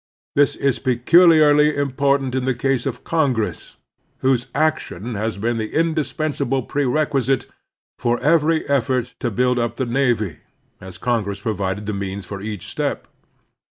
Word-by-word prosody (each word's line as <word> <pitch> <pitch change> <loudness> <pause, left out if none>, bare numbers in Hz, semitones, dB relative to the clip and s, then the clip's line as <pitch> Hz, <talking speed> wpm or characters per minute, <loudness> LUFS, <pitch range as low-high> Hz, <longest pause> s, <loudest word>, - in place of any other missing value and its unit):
This 145 -1 +3
is 140 -3 0
peculiarly 150 +3 +5
impor 140 0 +1
tant 135 -2 -5
in 130 -1 -1
the 130 -1 0
case 135 0 0
of 125 -2 -5
Congress, 135 -9 -1 0.4
whose 130 -1 +1
action 150 - -1
has 110 +1 -2
been 115 +3 -1
the 110 -1 -4
indispensable 155 -4 0
prerequisite 135 0 0 0.5
for 120 -1 0
every 160 +1 +2
effort 130 -2 0
to 120 - -1
build 125 +3 +1
up 120 -1 -1
the 130 - -2
navy, 120 - 0 0.4
as 95 -1 -10
Congress 105 -5 -2
provided 100 -2 -2
the 105 - -3
means 100 -1 -4
for 100 0 -7
each 105 -2 -5
step. - - -3
125 Hz, 145 wpm, -21 LUFS, 110-145 Hz, 0.5 s, peculiarly